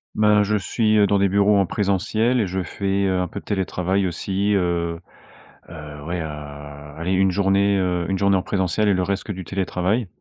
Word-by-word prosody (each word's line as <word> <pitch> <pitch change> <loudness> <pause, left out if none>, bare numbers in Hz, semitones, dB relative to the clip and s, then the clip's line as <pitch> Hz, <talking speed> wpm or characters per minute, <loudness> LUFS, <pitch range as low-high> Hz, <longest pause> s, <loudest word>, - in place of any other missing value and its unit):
Ben, 105 -1 +4
je 105 +1 0
suis, 110 +2 +1
heu, 105 -1 +5
dans 100 0 +2
des 100 - +3
bureaux 100 +2 +3
en 100 - +3
présentiel 110 +6 0
et 105 - +1
je 95 +1 -2
fais 100 +2 -1
un 90 -1 0
peu - - -7
de - - -30
télétravail 95 -1 -1
aussi, 95 +4 -1
heu. 85 -2 -1 0.7
Heu, 75 -3 -9
ouais, 85 +2 -3
heu, - - -3
allez 75 +3 -7
une 95 0 +3
journée, 100 +1 +2
heu, 90 -2 0
une 95 - 0
journée 100 +1 +3
en 95 - +2
présentiel 100 +2 0
et - - +4
le 90 0 0
reste 100 +1 -2
que - - -6
du 95 -2 -6
télétravail 95 +3 -1
95 Hz, 205 wpm, -22 LUFS, 90-100 Hz, 0.7 s, heu